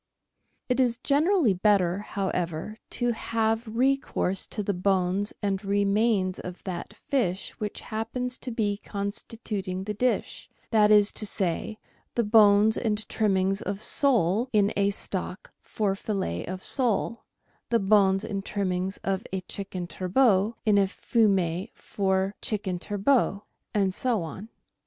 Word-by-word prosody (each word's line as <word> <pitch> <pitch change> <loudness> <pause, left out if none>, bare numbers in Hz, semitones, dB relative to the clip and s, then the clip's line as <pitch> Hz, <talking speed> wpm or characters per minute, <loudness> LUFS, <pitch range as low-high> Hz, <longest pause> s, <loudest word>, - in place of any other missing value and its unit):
It 250 0 0
is 245 -2 +2
generally 290 - +3
better, 185 -1 +2
however, 190 -1 -3
to 245 0 0
have 225 0 -1
re 255 +5 +2
course 195 -8 -2
to 210 - -4
the 200 - -1
bones 190 +2 +1
and 195 -1 -1
remains 200 -1 +1
of 180 0 -8
that 180 -1 -5
fish 200 -9 -1
which 210 -1 -4
happens 245 +3 -4
to 255 - -6
be 210 -4 -1
constituting 200 -2 -4
the 210 +2 -3
dish 250 +4 -1
— - - -37
that 210 -2 +5
is 210 -1 +6
to 215 - -1
say, 195 +3 -1 0.4
the 235 - +2
bones 210 0 +5
and 215 -2 -1
trimmings 195 -2 +1
of 200 +2 -4
sole 235 - +2
in 205 -2 +3
a 200 0 +2
stock 190 -1 -4
for 205 -3 -1
fillet 195 - -3
of 185 +1 -5
sole, 235 -2 0 0.5
the 235 - +3
bones 195 -1 +3
and 195 -3 -4
trimmings 190 -1 -2
of 195 -1 -1
a 190 -1 -2
chicken 185 -1 -5
turbot 195 +4 +2
in 210 -2 +4
a 195 - +3
fumet 190 -5 +1
for 190 0 -1
a - - -52
chicken 195 -4 -1
turbot, 205 +1 +1 0.3
and 195 -3 +1
so 230 -3 0
on. 190 +7 -8
205 Hz, 145 wpm, -27 LUFS, 190-225 Hz, 0.5 s, is